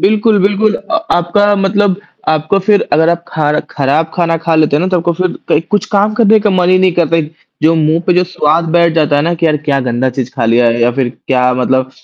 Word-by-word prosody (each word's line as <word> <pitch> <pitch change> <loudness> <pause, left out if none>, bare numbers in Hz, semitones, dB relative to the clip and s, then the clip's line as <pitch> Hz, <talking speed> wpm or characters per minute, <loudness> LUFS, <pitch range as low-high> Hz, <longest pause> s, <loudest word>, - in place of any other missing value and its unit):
बिल्कुल, 210 +1 +2
बिल्कुल 205 +2 +1
अ, 200 - -5 0.2
आपका 205 +4 +1
मतलब 195 0 0 0.3
आपको 155 +5 0
फिर 200 +2 +1
अगर 160 +3 +3
आप 170 0 -1
खार 150 -1 -1
खराब 150 +4 -1
खाना 165 -2 0
खा 165 - +1
लेते 155 -2 +2
हो - - 0
ना, 180 - 0
तो 185 - 0
आपको 170 0 -1
फिर 185 +1 -3
कई 150 - +2
कुछ 205 - 0
काम 205 +1 +1
करने 220 -1 +4
का 210 - 0
मन 180 -2 +1
ही 185 0 +4
नहीं 185 -1 +2
करता 165 -1 0
है। 165 - +1 0.4
जो 160 +1 +3
मुँह 160 +1 +1
पे 180 - +3
जो 180 +1 +2
स्वाद 165 -2 0
बैठ 170 0 +2
जाता 150 -3 +1
है 145 - +1
ना 170 - 0
कि 165 0 -1
यार 155 -1 +1
क्या 145 -2 -1
गंदा 125 0 -1
चीज़ 125 0 -5
खा 120 -4 -2
लिया 120 +1 +2
है 115 0 0
या 120 +1 +2
फिर 130 -1 -1 0.2
क्या 125 -1 +1
मतलब 130 +1 -1
165 Hz, 250 wpm, -12 LUFS, 145-190 Hz, 0.4 s, करने